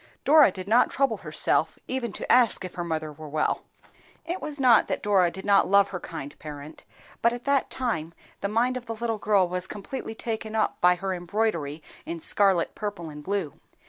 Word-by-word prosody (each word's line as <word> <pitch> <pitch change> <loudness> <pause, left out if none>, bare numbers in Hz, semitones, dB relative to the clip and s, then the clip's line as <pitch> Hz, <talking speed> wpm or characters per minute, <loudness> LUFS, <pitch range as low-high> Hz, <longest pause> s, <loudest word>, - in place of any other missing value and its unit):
Dora 300 -2 +7
did 185 0 -7
not 230 +4 +4
trouble 275 0 +1
herself - - +1
even 255 -3 -2
to - - -3
ask 240 -6 +4
if 180 - -7
her 175 - -4
mother 155 -2 -3
were 155 +1 -10
well. 155 +1 0 0.6
It 350 +3 -4
was 300 -1 -6
not 245 -4 +5
that - - -3
Dora 195 -4 +3
did 190 +3 -9
not 200 -1 +4
love 200 0 +5
her 180 - -5
kind 145 -3 -7
parent, 150 0 -9 0.4
but 235 +1 +3
at 240 0 -7
that 280 -1 +1
time 170 -11 -3 0.2
the - - -1
mind 240 +5 +1
of 245 - -9
the 225 - -4
little 225 -1 -2
girl 200 -3 +3
was 180 +1 -2
completely 225 +3 -6
taken 220 -1 -4
up 220 - 0
by 180 0 +5
her 190 +1 -3
embroidery 175 -5 -2 0.2
in 170 0 -5
scarlet, 190 0 +2
purple, 200 -6 -5
and 150 0 -10
blue. 190 -4 -3
200 Hz, 200 wpm, -26 LUFS, 170-235 Hz, 0.6 s, Dora